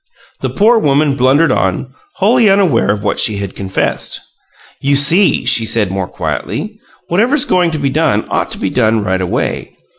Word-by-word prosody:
The - - -3
poor 225 +3 +3
woman 145 -3 +1
blundered 135 +5 +2
on, - - -2 0.2
wholly 225 +2 +3
unaware 190 - +2
of 105 0 -1
what 105 - -2
she 110 -4 +2
had 100 -1 -6
confessed. 95 -1 -3 0.6
"You 140 +1 +1
see," 165 +8 +3
she 115 - +4
said, 110 -3 0
more 95 -1 -3
quietly, - - -5 0.3
"whatever's 245 - +2
going 180 -2 +1
to 160 - -4
be 140 -1 -1
done 145 -8 0
ought - - -1
to - - -7
be 95 - -3
done 110 -3 +1
right 95 -2 -1
away. 90 - -3
140 Hz, 175 wpm, -14 LUFS, -, 0.6 s, she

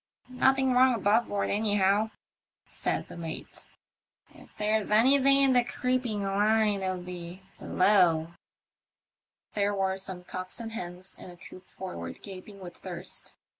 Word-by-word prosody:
"Nothing 265 0 +3
wrong 255 0 +5
above 220 +2 +2
board 200 -1 -1
anyhow," 205 0 +2 0.6
said - - -2
the - - -10
mate; 165 -2 -7 0.3
" - - -43
if - - -21
there's 215 0 0
anything 270 +5 +5
in 270 -1 +5
the 245 -1 +5
creeping 245 -4 -1
line 205 +1 +2
it'll 185 -1 -1
be 180 +1 -8 0.2
below." 175 -4 +3 1.2
There 205 0 0
were 190 -1 0
some 190 -1 -6
cocks 185 +4 -6
and 225 -1 -6
hens 180 -3 -7
in - - -10
a 175 - -12
coop 185 +1 -12
forward 85 - -8
gaping 195 +1 -10
with 175 -1 -8
thirst. 180 -1 -6
200 Hz, 140 wpm, -28 LUFS, 185-220 Hz, 1.2 s, wrong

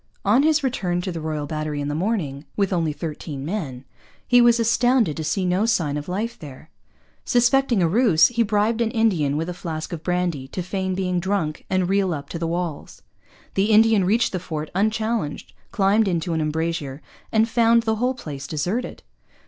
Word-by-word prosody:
On 215 +7 +4
his 305 0 +2
return 185 -9 -1
to 185 - -4
the 165 -2 -5
Royal 155 -2 -3
Battery 155 0 -3
in 145 - -3
the 145 - -2
morning, 160 -6 -2
with 200 -2 +1
only 165 -3 +1
thirteen 150 -2 -6
men, 145 -9 -4 0.4
he 245 -1 +6
was 240 0 +5
astounded 230 - +2
to 160 - -4
see 185 +5 -1
no 185 +5 +1
sign 160 -10 +1
of 150 +3 -5
life 225 +6 -3
there. 145 +1 -11 0.5
Suspecting 245 -3 +3
a - - +3
ruse, 190 -4 +4
he 235 -1 0
bribed 220 +1 +1
an 230 - +1
Indian 185 -11 +1
with 165 +2 -2
a 180 - -3
flask 165 -2 -5
of 165 - -5
brandy 175 -6 -1
to 180 +6 -5
feign 190 0 -2
being 180 -1 -1
drunk 175 -4 -2
and 185 -1 +1
reel 190 -2 +1
up 140 - -8
to 165 - -5
the 165 - -2
walls. 170 -2 -4 0.5
The 195 - +2
Indian 220 -1 +5
reached 225 +6 +2
the 185 - -2
fort 155 -3 -5
unchallenged, 215 -3 -1 0.2
climbed 210 0 +3
into 170 -1 -1
an 160 - 0
embrasure, 155 -2 -3 0.3
and 220 0 +3
found 230 0 +3
the 220 -1 0
whole 250 +3 0
place 140 - -7
deserted. 180 - -3
180 Hz, 190 wpm, -23 LUFS, 155-225 Hz, 0.5 s, he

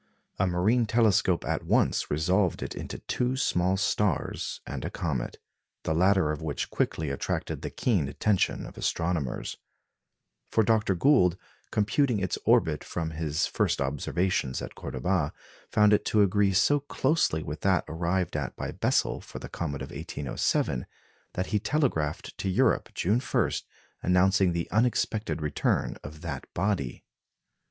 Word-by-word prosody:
A 95 - +3
marine 105 +7 +2
telescope 105 -6 +3
at - - -1
once - - +2
resolved 90 +5 +1
it - - -5
into - - -6
two 125 +1 -1
small 90 -6 +1
stars 100 -4 0
and - - -5
a - - -2
comet, 70 -8 -3 0.5
the 80 - 0
latter 90 -1 +3
of 75 - -4
which 80 -3 -3
quickly 75 -3 -1
attracted 70 - -3
the - - -4
keen 95 - 0
attention 95 +8 +1
of - - -10
astronomers; 80 -7 -1 0.9
for 110 - +3
Dr. 110 -3 +2
Gould, 90 - +4 0.3
computing 115 +4 +2
its 95 -2 -2
orbit - - +3
from 80 -2 -3
his 75 -1 -1
first - - 0
observations 70 +1 0
at - - -6
Cordoba, 75 +3 -1 0.4
found 105 0 +5
it 105 - +3
to 105 -1 +4
agree 100 0 +3
so 145 +10 +4
closely 135 - +1
with 75 +2 -6
that 95 -4 +2
arrived 85 +2 -1
at 70 -4 -3
by - - -4
Bessel - - 0
for - - -10
the - - -7
comet 70 -5 -4
of 65 - -8
1807 65 -2 -1 0.5
that 90 - -1
he 105 - +3
telegraphed 105 - -1
to 95 - -1
Europe, 90 - +2
June 105 +7 +2
1, 130 - 0 0.5
announcing 90 +1 +3
the 85 0 -2
unexpected 110 -5 0
return 75 -1 0
of 75 +1 -9
that 75 -6 -6
body. 95 -9 -1
90 Hz, 145 wpm, -28 LUFS, 80-105 Hz, 0.9 s, found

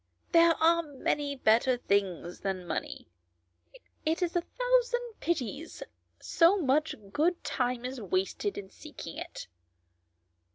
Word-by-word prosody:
There 335 -1 +6
are 335 +1 +4
many 290 -1 -2
better 245 +1 +3
things 190 -6 -1
than 190 -2 -3
money; - - -4 1.0
it 325 +3 0
is 345 0 -2
a 350 - +3
thousand 485 +1 0
pities 315 - -3 0.4
so 345 +4 +4
much 305 -1 +1 0.2
good 345 +4 +1
time 250 -1 -1
is 255 -1 -5
wasted 195 - -1
in 190 -1 -7
seeking - - -9
it." - - -7
295 Hz, 120 wpm, -30 LUFS, 235-340 Hz, 1.0 s, There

